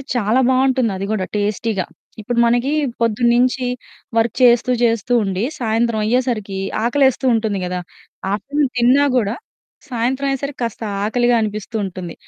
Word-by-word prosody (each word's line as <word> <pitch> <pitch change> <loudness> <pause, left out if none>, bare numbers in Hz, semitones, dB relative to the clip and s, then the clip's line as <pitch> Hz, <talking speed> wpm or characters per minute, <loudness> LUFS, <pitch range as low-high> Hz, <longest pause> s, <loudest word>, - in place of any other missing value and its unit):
చాలా 235 +2 +2
బావుంటుంది 260 -3 +2
అది 195 - -3
గూడా 205 -4 -1
టేస్టీగా. 205 -1 -1 0.4
ఇప్పుడు 235 +3 -1
మనకి 240 +4 +1 0.3
పొద్దున్నించి 240 +3 +2 0.5
వర్క్ 225 -1 +1
చేస్తూ 245 +1 +5
జేస్తూ 230 0 +1
ఉండి, 195 0 -2 0.2
సాయంత్రం 230 -1 0
అయ్యేసరికి 225 -5 -1 0.2
ఆకలేస్తూ 265 +2 +2
ఉంటుంది 220 -3 0
గదా! 180 0 -3 0.5
ఆఫ్టర్‌నూన్ 275 +6 -1
తిన్నా 255 +4 +4
గూడా 220 -2 0 0.5
సాయంత్రం 255 +3 -1
అయ్యేసరికి 275 +1 -3
కాస్త 230 -2 -3 0.2
ఆకలిగా 240 +3 +2
అనిపిస్తూ 215 +1 -4
ఉంటుంది. 180 -2 -6
235 Hz, 125 wpm, -19 LUFS, 210-255 Hz, 0.5 s, చేస్తూ